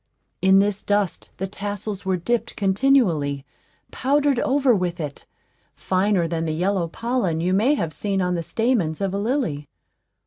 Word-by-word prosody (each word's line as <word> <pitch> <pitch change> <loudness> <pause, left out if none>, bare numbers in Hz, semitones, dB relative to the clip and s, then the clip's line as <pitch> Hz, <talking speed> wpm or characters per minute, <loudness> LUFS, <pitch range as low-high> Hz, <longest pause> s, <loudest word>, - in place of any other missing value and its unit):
In 190 +1 +5
this 200 0 +2
dust 205 -3 -1
the 190 - -2
tassels 205 0 -5
were 190 -1 +1
dipped 235 +7 -2
continually 190 - +2 0.5
powdered 280 -1 +1
over 270 -1 +3
with 180 -3 -1
it, 150 -3 -6 0.5
finer 185 -2 +1
than 165 0 -2
the 160 - -1
yellow 180 0 0
pollen 215 -3 -1
you 180 +3 0
may 235 +10 +3
have 165 - -3
seen 200 +4 -1
on 180 -1 0
the 170 - -1
stamens 200 -4 0
of 195 -1 -1
a 200 - -1
lily. 210 - -2
195 Hz, 160 wpm, -23 LUFS, 170-225 Hz, 0.5 s, In